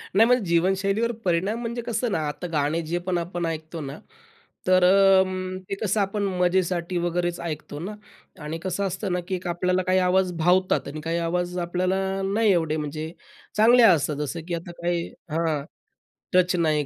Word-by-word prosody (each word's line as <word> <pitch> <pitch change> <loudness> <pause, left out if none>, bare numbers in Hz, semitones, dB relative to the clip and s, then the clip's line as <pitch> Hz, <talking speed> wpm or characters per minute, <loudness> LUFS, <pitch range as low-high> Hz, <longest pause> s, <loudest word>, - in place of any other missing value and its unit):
नाही 220 +3 +7
म्हणजे 250 -2 +3
जीवनशैलीवर 195 +6 +1
परिणाम 190 +6 +1
म्हणजे 235 0 -3
कसं 235 0 -2
ना, 165 - 0
आता 145 +4 -5
गाणे 150 +2 +1
जे 165 +2 -2
पण 180 -1 +1
आपण 175 0 -3
ऐकतो 160 0 -4
ना, 140 +1 -7 0.7
तर 185 0 +5
अं, 185 -1 +4
ते - - -1
कसं 215 0 +1
आपण 200 +1 -1 0.2
मजेसाठी 180 -1 +1
वगैरेच 175 0 -1
ऐकतो 155 -3 -5
ना. 190 +6 -5 0.5
आणि 155 +2 -4
कसं 185 +1 -2
असतं 190 +1 -3
ना 180 - 0
की 190 - -1
एक 180 0 -6
आपल्याला 180 +1 0
काही 185 0 +4
आवाज 185 0 +2
भावतात 180 +3 +2
आणि 150 +2 -6
काही 165 +2 -2
आवाज 175 +1 -1
आपल्याला 180 +2 0 0.4
नाही 220 -1 +3
एवढे, 160 -4 +1
म्हणजे 155 +1 -4 0.5
चांगले 235 +3 +6
असतात 155 -8 +4
जसं, 150 +3 -3
की 175 - -3
आता 170 +1 -7
काही 170 0 -1 0.2
हां, 160 -2 0 0.7
टच 180 0 +4
नाही 155 -4 +1
180 Hz, 175 wpm, -25 LUFS, 165-190 Hz, 0.7 s, नाही